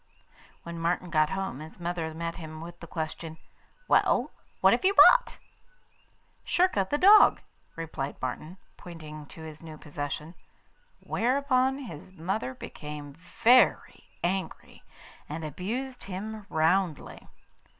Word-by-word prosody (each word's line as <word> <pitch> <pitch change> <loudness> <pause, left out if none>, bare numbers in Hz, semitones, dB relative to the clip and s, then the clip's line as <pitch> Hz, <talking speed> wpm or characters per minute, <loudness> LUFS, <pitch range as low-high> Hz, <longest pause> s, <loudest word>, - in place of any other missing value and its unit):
When 170 0 -7
Martin 170 +1 -1
got 155 -2 +3
home, 190 -7 -3
his 155 +3 -11
mother 170 -2 -3
met 165 +1 -4
him 155 -2 -8
with 170 +1 -9
the 170 - -10
question: 160 0 -5 0.5
'Well, - - +3 0.3
what - - +6
have - - 0
you 390 +1 +3
bought?' - - +7 1.1
'Schurka, 345 - +2
the 290 - +1
dog,' 410 +6 +7 0.4
replied 155 -4 -5
Martin, 155 +8 -5 0.2
pointing 155 -3 -10
to 160 - -12
his 155 -1 -10
new 160 -2 -10
possession. 150 +2 -6 0.7
Whereupon 260 +1 +1
his 185 - -9
mother 175 -6 -3
became 150 -1 -8
very 220 - +3 0.2
angry, 185 +2 -3 0.5
and 155 +2 -5
abused 240 - -5
him 205 +2 -6
roundly. 165 +1 0
170 Hz, 120 wpm, -28 LUFS, 155-200 Hz, 1.1 s, bought